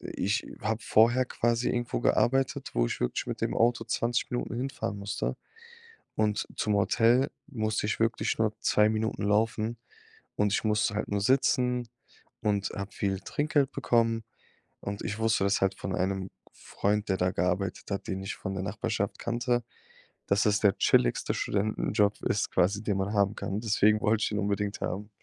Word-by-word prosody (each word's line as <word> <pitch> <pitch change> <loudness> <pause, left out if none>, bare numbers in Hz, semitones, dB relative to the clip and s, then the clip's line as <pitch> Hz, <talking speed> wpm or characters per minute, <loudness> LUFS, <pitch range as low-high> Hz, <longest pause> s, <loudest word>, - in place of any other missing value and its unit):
ich 100 +3 -2
habe 110 +1 -1
vorher 120 +4 +4
quasi 120 -1 0
irgendwo 120 -1 -2
gearbeitet, 135 +3 +1
wo - - +3
ich - - -4
wirklich 60 - -1
mit - - -4
dem - - -1
Auto 120 0 +2
20 120 +2 -1
Minuten 120 -2 -3
hinfahren 125 -6 -3
musste. 100 0 -3 0.8
Und 105 -1 0
zum 105 -1 +1
Hotel 115 +6 +3 0.2
musste 110 -6 -1
ich 110 - -1
wirklich 115 0 +1
nur 110 -1 +2
2 105 0 +3
Minuten 110 -1 -1
laufen 110 +2 +1 0.6
und 105 -1 +2
ich - - +1
musste 105 -1 +1
halt 105 - -2
nur 100 -1 -1
sitzen 125 0 +2 0.5
und 100 -2 +1
hab 100 0 -6
viele 95 -1 -1
Trinkgeld 145 -2 0
bekommen. 115 -3 +1 0.6
Und 100 0 -5
ich 105 0 -4
wusste 110 -3 +2
das 100 0 +2
halt 95 0 +2
von 95 - -4
einem 95 0 -1 0.2
Freund, 105 +1 -2
der 95 - +2
da 90 +1 +2
gearbeitet 90 +3 -2
hat, 100 - -3
den 95 0 -3
ich 95 - -4
von 95 - -5
der 95 - -3
Nachbarschaft - - -2
kannte, 120 0 -1 0.6
dass 100 +1 +2
das 105 0 +2
der 100 -3 +3
chilligste - - +2
Studentenjob 105 0 0
ist - - 0
quasi, 100 +4 +2
den 105 -3 0
man 100 +2 -1
haben 100 0 +2
kann. 100 +1 -3
Deswegen 110 -1 +3
wollte 110 0 +2
ich - - +2
den 105 - -1
unbedingt 100 0 -1
haben. 100 +4 -3
105 Hz, 170 wpm, -28 LUFS, 100-115 Hz, 0.8 s, vorher